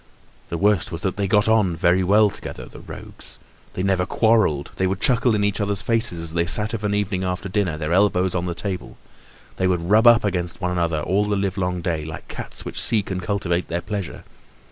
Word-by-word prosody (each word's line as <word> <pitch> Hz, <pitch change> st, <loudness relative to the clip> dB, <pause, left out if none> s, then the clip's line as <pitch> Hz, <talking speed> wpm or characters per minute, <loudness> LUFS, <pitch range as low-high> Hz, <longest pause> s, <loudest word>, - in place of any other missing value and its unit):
The 85 Hz, -, -3 dB
worst 100 Hz, -1 st, +2 dB
was 85 Hz, -1 st, -6 dB
that 95 Hz, -, -1 dB
they 100 Hz, -1 st, -1 dB
got 105 Hz, +1 st, +3 dB
on 105 Hz, -6 st, +3 dB
very 90 Hz, +2 st, +2 dB
well 105 Hz, +2 st, +4 dB
together, -, -, -7 dB
the -, -, -13 dB
rogues. -, -, -11 dB, 0.4 s
They 95 Hz, -, -3 dB
never 95 Hz, -2 st, +1 dB
quarreled; 110 Hz, -11 st, +2 dB
they 95 Hz, -, +1 dB
would 95 Hz, 0 st, -2 dB
chuckle 125 Hz, -2 st, +3 dB
in 105 Hz, -, 0 dB
each 100 Hz, +1 st, 0 dB
other's 100 Hz, 0 st, -1 dB
faces, 115 Hz, -5 st, +1 dB
as 80 Hz, -1 st, -3 dB
they 85 Hz, 0 st, 0 dB
sat 105 Hz, +6 st, +1 dB
of 110 Hz, -2 st, -4 dB
an 100 Hz, 0 st, 0 dB
evening 100 Hz, -2 st, -1 dB
after 90 Hz, +1 st, -3 dB
dinner, 95 Hz, -5 st, -1 dB
their 75 Hz, +1 st, -2 dB
elbows 95 Hz, -1 st, +2 dB
on 85 Hz, -1 st, -1 dB
the 85 Hz, -1 st, -3 dB
table; 95 Hz, -2 st, -5 dB, 0.6 s
they 95 Hz, -, +1 dB
would 90 Hz, 0 st, -1 dB
rub 110 Hz, +3 st, +6 dB
up 120 Hz, -2 st, +7 dB
against 90 Hz, -4 st, -2 dB
one 90 Hz, -2 st, -1 dB
another 85 Hz, -3 st, 0 dB
all 100 Hz, +6 st, +1 dB
the 105 Hz, 0 st, 0 dB
live 100 Hz, -1 st, -1 dB
long 90 Hz, -2 st, -2 dB
day, 85 Hz, -3 st, -2 dB
like 80 Hz, +1 st, -8 dB
cats -, -, -8 dB
which -, -, -4 dB
seek 105 Hz, -4 st, 0 dB
and 90 Hz, -1 st, -2 dB
cultivate 90 Hz, -2 st, -1 dB
their 85 Hz, +1 st, -2 dB
pleasure. 100 Hz, -1 st, -5 dB
95 Hz, 225 wpm, -22 LUFS, 85-105 Hz, 0.6 s, up